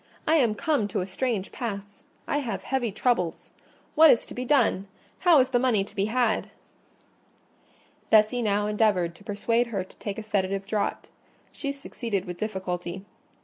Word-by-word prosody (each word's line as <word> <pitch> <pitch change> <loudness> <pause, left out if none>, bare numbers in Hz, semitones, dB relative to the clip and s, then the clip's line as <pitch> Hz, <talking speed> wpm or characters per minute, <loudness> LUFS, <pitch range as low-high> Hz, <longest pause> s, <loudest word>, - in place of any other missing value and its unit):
I 315 - +3
am 235 -7 +2
come 280 -3 0
to 205 -2 -2
a - - -2
strange 200 +1 -2
pass: 205 -4 -6 0.2
I 290 - +1
have 245 -5 -4
heavy 255 -5 -1
troubles. 190 -6 -1 0.4
What 320 0 +8
is 235 - +4
to - - -10
be 250 - -4
done? 240 -8 +2 0.3
How 350 -4 +6
is 255 - +3
the 245 - +2
money 240 -6 +2
to - - -14
be 195 - +1
had?" 230 0 +1 1.6
Bessie 220 +3 +4
now 205 -2 +1
endeavoured 210 -5 +1
to 170 - -18
persuade 230 +3 0
her 200 -5 -2
to 185 - -19
take 205 -2 -5
a 220 - -5
sedative 195 -2 -1
draught: 205 0 -2 0.4
she 280 - -4
succeeded 235 -8 -4
with 175 -1 -7
difficulty. 190 -3 -4
215 Hz, 170 wpm, -26 LUFS, 195-245 Hz, 1.6 s, What